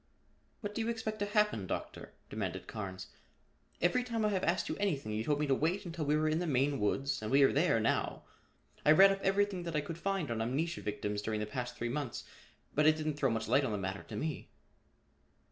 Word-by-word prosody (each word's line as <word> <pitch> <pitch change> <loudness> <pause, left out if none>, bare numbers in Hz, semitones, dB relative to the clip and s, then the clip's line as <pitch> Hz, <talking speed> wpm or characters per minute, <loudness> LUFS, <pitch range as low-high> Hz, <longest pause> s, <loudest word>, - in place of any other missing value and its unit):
"What 205 -2 -4
do 230 - -2
you 225 - -1
expect 220 -2 -3
to 205 - 0
happen, 210 - +1
Doctor?" - - -5
demanded - - -4
Carnes. 95 -3 -6 0.8
"Every 245 +8 +3
time 230 -3 -1
I - - +3
have 190 -3 -1
asked 175 +2 +1
you - - -2
anything 150 - -1
you 105 +1 -1
told 145 +3 +1
me 150 - +1
to 140 - +2
wait 165 +9 0
until 165 -3 -4
we 150 +1 +2
were 155 0 +1
in 155 +1 +1
the 175 - -2
Maine 140 0 +1
woods 135 +6 0
and 110 - -3
we 140 +1 +5
are 135 - +5
there 145 -5 +3
now. 110 - 0 0.6
I 150 - +7
read 195 +5 +8
up 195 0 -2
everything 195 -1 +1
that 170 -2 -4
I 150 - +2
could 160 +3 -6
find 195 -8 -1
on 115 -1 -1
amnesia 150 +9 -1
victims 105 0 -3
during 110 0 -2
the 105 - -1
past 125 +2 -4
three 120 - -2
months 130 -1 -3 0.5
but 150 +1 +4
it 155 - +6
didn't 155 -1 -2
throw 140 -2 +1
much 115 -1 -1
light 130 +5 +4
on 130 - -1
the - - -1
matter 95 0 -3
to 105 - -9
me." 155 +6 -3
150 Hz, 230 wpm, -33 LUFS, 115-185 Hz, 0.8 s, read